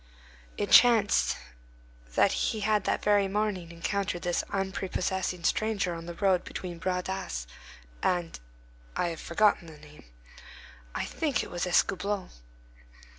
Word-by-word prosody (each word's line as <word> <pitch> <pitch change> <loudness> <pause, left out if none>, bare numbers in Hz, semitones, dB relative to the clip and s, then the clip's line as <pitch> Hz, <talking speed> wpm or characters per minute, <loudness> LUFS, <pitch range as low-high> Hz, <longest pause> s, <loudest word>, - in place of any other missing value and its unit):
It - - -2
chanced 230 -4 +6 0.8
that - - +5
he 215 - -1
had 210 -1 +1
that - - 0
very 205 -1 +4
morning 195 -3 -1
encountered 175 +1 -2
this 175 -1 0
unprepossessing 190 -2 -2
stranger 210 -4 +1
on 165 0 -7
the 170 - -6
road 190 -1 +2
between 175 -2 -6
Bras 180 0 -1
d'Asse 65 - -4 0.6
and—I - - -3
have 165 - -6
forgotten 190 -1 +2
the 160 -2 -11
name. 150 0 -16 0.9
I - - -1
think 290 -8 -1
it - - -9
was 175 +1 -2
Escoublon. 195 +2 +1
185 Hz, 125 wpm, -29 LUFS, 170-200 Hz, 0.9 s, chanced